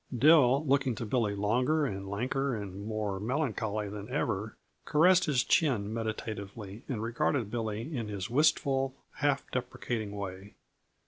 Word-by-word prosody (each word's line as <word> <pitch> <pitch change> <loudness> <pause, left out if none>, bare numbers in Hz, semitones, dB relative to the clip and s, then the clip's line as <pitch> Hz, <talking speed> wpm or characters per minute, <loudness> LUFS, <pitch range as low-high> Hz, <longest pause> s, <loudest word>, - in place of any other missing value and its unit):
Dill, 140 0 +6
looking 135 -3 +2
to 115 - -4
Billy 105 -3 0
longer 125 +10 +2
and 100 -6 -4
lanker 125 +4 -1
and 100 0 -7
mere 105 -3 -2
melancholy 110 -4 -1
than 105 +2 -7
ever, 110 -5 -2 0.3
caressed 180 +4 +5
his 135 -5 +2
chin 110 -10 +2
meditatively 110 -2 -5
and 115 -5 -2
regarded 115 -1 0
Billy 115 +5 -3
in 115 -4 -3
his 100 -3 -4
wistful, 135 -1 +2 0.2
half 145 -2 +1
deprecating 120 -3 -3
way. 100 0 -7
115 Hz, 135 wpm, -30 LUFS, 105-135 Hz, 0.3 s, Dill